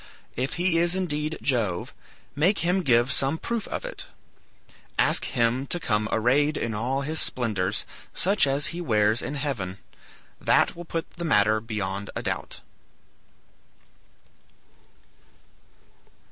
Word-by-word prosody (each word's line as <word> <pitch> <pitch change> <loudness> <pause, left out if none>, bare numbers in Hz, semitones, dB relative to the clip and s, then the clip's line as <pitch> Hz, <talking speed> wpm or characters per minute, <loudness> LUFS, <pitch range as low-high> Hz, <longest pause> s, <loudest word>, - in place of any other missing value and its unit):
If 130 +3 -2
he 175 -1 +2
is 175 +1 +3
indeed 155 -4 -2
Jove, 110 -10 0 0.4
make 165 +4 +2
him 180 +2 +2
give 125 -4 +3
some 135 +4 +1
proof 230 +4 -3
of - - -4
it. - - -7 0.9
Ask - - +4
him 120 +3 0
to 175 - -1
come 105 -7 0
arrayed 140 +7 +2
in 115 - -2
all 125 +6 -1
his 155 +3 0
splendors, 105 -6 -1 0.3
such 195 -4 +3
as 140 +1 +2
he 175 - -4
wears 110 -5 +2
in 145 - -4
heaven. 120 -11 -3 0.6
That - - +3
will 175 +1 -8
put 165 0 -3
the 170 - -4
matter 110 -8 +3
beyond 100 -3 -4
a - - -3
doubt." - - -4
135 Hz, 130 wpm, -26 LUFS, 110-165 Hz, 0.9 s, Ask